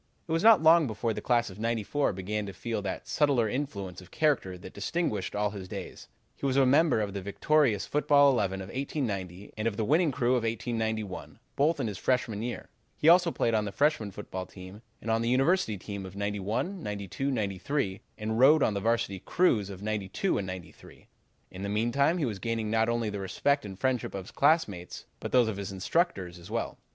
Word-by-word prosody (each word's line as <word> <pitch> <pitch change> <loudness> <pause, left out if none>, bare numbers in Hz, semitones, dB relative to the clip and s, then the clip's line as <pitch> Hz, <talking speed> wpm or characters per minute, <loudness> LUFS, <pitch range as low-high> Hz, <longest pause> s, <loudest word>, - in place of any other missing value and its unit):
"It - - -6
was 165 0 +2
not 220 -6 +7
long 160 -1 +6
before 110 +1 -2
the - - -5
class 120 -3 +1
of 95 - -12
'94 115 +5 0
began 100 +3 -3
to 100 - -6
feel 115 -1 -3
that 100 -1 -5
subtler 140 -7 +2
influence 100 -8 -4
of 90 - -15
character 140 -12 0
that 90 +1 -11
distinguished 105 - -2
all 105 0 0
his 95 -2 -7
days. 95 -1 -8 0.3
He - - -26
was 135 0 +1
a 135 - +5
member 145 -2 +4
of 100 -2 -3
the 100 - -4
victorious 110 +3 +2
football 145 -1 +4
eleven 95 -6 0
of 95 - -8
1890, 105 - -4
and 110 +1 -1
of 105 -3 -2
the 110 - 0
winning 155 +5 +3
crew 125 -2 0
of 125 -1 +3
1891, 110 -3 -3 0.2
both 150 +2 +2
in 135 - 0
his 105 -5 -4
freshman 120 -5 0
year. 120 +1 -5 0.3
He 155 - +4
also 175 0 +6
played 115 -7 0
on 105 -1 +2
the 100 - -4
freshman 140 -5 +1
football 95 -2 -6
team 95 +3 -11 0.2
and 115 - -1
on 115 0 +2
the 115 - 0
university 135 - +2
team 100 +1 -6
of 95 - -12
'91, 105 - -2
'92, 105 - -3
'93, 100 -1 -2 0.2
and 110 +1 -2
rowed 145 +4 +6
on 110 - +2
the 100 - -1
Varsity 115 -2 0
crews 110 - +2
of 100 0 -8
'92 105 - -1
and 95 - -4
'93. 90 -3 -10 0.4
In 90 - -8
the 100 - -3
meantime 120 - +2
he 160 - 0
was 105 -5 -3
gaining 115 -1 -2
not 110 0 +2
only 115 -2 0
the 100 - -4
respect 140 +9 0
and 95 -2 -8
friendship 125 +1 -1
of 95 -2 -5
his - - -12
classmates, 135 - +1
but - - -5
those 125 -3 +5
of 110 -3 -3
the 100 -2 -4
instructors 95 - -1
as 85 +3 -12
well. 115 +1 -3
110 Hz, 210 wpm, -29 LUFS, 100-140 Hz, 0.4 s, not